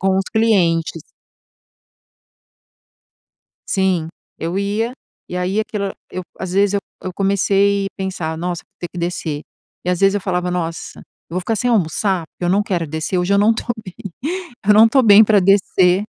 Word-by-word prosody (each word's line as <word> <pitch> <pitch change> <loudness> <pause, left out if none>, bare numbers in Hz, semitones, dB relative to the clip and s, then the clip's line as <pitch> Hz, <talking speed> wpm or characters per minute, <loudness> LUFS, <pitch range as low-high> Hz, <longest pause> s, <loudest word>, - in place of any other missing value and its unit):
com 190 0 +2
os 195 - +1
clientes. 170 -8 +2 2.7
Sim. 185 -4 +1 0.3
Eu 170 +4 -2
ia, 210 +4 -1 0.4
e 180 - -6
aí 185 +4 0
aquilo 210 -2 -2
era 195 - -5 0.2
eu 185 - -4 0.2
às 190 -2 -4
vezes 200 +1 +3
eu - - +2 0.2
eu 185 - -4
comecei 200 +1 +2
pensar: 175 -4 -3
"Nossa, 175 0 -3
vou - - -52
ter 175 - -4
que 180 - -10
descer", 170 -4 -3 0.4
e 180 - -2
às 180 -1 0
vezes 195 0 +4
eu 205 - -1
falava: 180 -1 -1
"Nossa, 165 -2 -4
eu - - -22
vou 180 - 0
ficar 205 +5 -1
sem 245 +4 0
almoçar? 190 -3 +1
Eu 175 - -1
não 200 +3 +3
quero 180 -5 -1
descer, 160 +4 -3
hoje 180 +3 +1
eu - - +4
não 215 +3 +4
tô - - -5 0.2
bem 185 - -9 0.7
eu 210 - +7
não 220 +2 +8
tô 265 +3 +4
bem 215 -1 +8
pra 210 -1 +4
descer, 190 -1 +3
190 Hz, 180 wpm, -19 LUFS, 175-200 Hz, 2.7 s, não